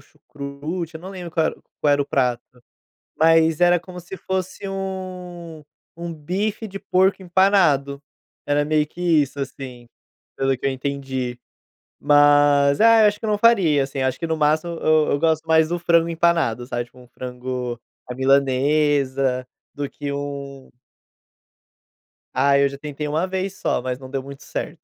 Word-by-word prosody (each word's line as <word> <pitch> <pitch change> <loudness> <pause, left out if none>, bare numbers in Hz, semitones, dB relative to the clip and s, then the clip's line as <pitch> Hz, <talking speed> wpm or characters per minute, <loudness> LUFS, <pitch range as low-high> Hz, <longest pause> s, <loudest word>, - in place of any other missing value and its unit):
chucrute, 150 +4 -7
eu 160 - -8
não 185 +3 -8
lembro 180 -3 -7
qual 160 -2 +1
era - - -1
o - - -28 0.2
qual 145 - +3
era 145 0 +2
o - - -9
prato. 125 -3 0 0.8
Mas 165 0 +4
era 175 0 +5
como 180 +1 -10
se 180 +2 -9
fosse 190 +1 -4
um 180 -4 -6 0.4
um 170 -1 -4
bife 195 +8 -3
de 195 0 -8
porco 190 +1 +2
empanado, 175 -7 +2 0.4
era 145 0 +1
meio 150 0 +1
que 175 +3 -11
isso, 155 -5 +2
assim, 130 -3 -7 0.5
pelo 135 -1 +1
que - - -7
eu 135 - +2
entendi. 130 -2 -4 0.6
Mas, 145 -1 +4
ah, 230 0 +6
eu - - +7
acho 205 0 -1
que - - -5
eu - - -1
não 210 - +1
faria, 195 -11 +4
assim, 135 0 -4
acho 130 0 -1
que 165 - -3
no 160 0 -1
máximo 155 +3 +1
eu 155 -1 +3
eu 145 - +1
gosto 160 0 +1
mais 160 -1 +4
do 175 0 -2
frango 170 -1 +3
empanado, 165 -8 +1
sabe, 120 -2 -3
tipo, 120 +1 -20
um 125 - -16
frango 125 0 -5 0.3
à 125 - -5
milanesa, 135 -1 +2 0.3
do 145 -1 -4
que 145 -1 -6
um 140 -1 -6 1.7
Ai, 140 +1 +3
eu - - +3
já 140 0 -9
tentei 150 0 -5
1 155 +5 0
vez 190 +1 -4
só, - - 0
mas 125 0 -3
não 130 -1 -11
deu 135 -1 -3
muito 140 +1 -11
certo. - - -6
150 Hz, 175 wpm, -22 LUFS, 135-175 Hz, 1.7 s, eu